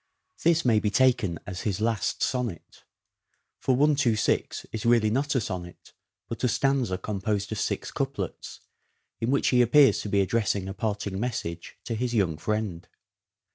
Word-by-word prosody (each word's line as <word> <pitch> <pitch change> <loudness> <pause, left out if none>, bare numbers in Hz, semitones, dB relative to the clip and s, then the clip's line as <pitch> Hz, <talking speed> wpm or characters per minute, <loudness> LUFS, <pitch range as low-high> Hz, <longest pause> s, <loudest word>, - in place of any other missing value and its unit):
This 165 -2 +3
may 115 -3 +4
be 105 - 0
taken 120 -5 +2
as 90 -1 -6
his 105 -2 -2
last 110 -1 0
sonnet; 120 -10 -3 0.7
for 130 - +1
126 135 -5 +1
is 110 - -4
really 115 -3 +3
not 140 +5 0
a - - +4
sonnet 90 -5 -7 0.3
but 115 - -6
a - - +4
stanza 130 -6 +1
composed 100 0 -2
of 110 - -3
six - - -2
couplets, - - -4 0.6
in 115 - -1
which 140 - +2
he 125 -1 +4
appears 135 +3 +5
to 105 - -5
be 100 0 +3
addressing 100 -1 0
a 95 - -4
parting 100 -2 -3
message 85 -8 -4
to 115 - -4
his 120 +2 -2
young 90 -8 +1
friend. 105 -2 -3
110 Hz, 160 wpm, -26 LUFS, 100-125 Hz, 0.7 s, appears